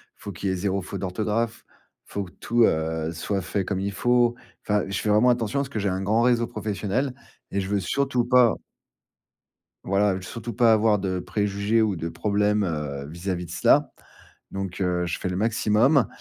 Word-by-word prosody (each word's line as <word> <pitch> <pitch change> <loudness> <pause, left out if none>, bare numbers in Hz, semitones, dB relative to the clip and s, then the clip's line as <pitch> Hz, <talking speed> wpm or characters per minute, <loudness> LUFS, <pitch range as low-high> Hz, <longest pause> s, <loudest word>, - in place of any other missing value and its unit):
Faut 100 - -8
qu'il 95 +2 -3
y - - +1
ait - - -1
0 95 +1 -1
fautes 95 +1 -6
d'orthographe. 110 +4 -2 0.4
Faut 100 - -4
que 90 - -11
tout, 120 0 +1
heu, 80 -2 +1
soit 95 +4 -2
fait 95 +1 -2
comme 95 -2 -2
il 100 - -2
faut. 120 +3 +2 0.3
Enfin, 105 -1 +1
je 100 -1 -3
fais 105 - -2
vraiment 110 +4 +5
attention 120 +2 +1
parce 140 -1 -2
que 110 - -3
j'ai 100 -1 0
un 95 +1 -2
grand 110 +4 +2
réseau 120 -1 +3
professionnel 110 +6 -2 0.4
et 100 - 0
je 95 - -3
veux 100 -1 0
surtout 135 +5 0
pas 125 -2 +5 1.3
voilà, 100 0 +1
surtout 115 +5 -6
pas 115 +1 +5
avoir 110 -1 +3
de 95 -1 -2
préjugés 100 +4 0
ou 105 -3 +1
de 85 0 -4
problèmes, 105 +3 +1
heu, 75 -5 -3
vis-à-vis 90 +2 -4
de - - -10
cela. - - +3 0.6
Donc 95 -1 -5
heu, 90 -1 0
je 85 - -3
fais 95 - -2
le 90 - -3
maximum 110 +4 +3
100 Hz, 195 wpm, -25 LUFS, 95-115 Hz, 1.3 s, vraiment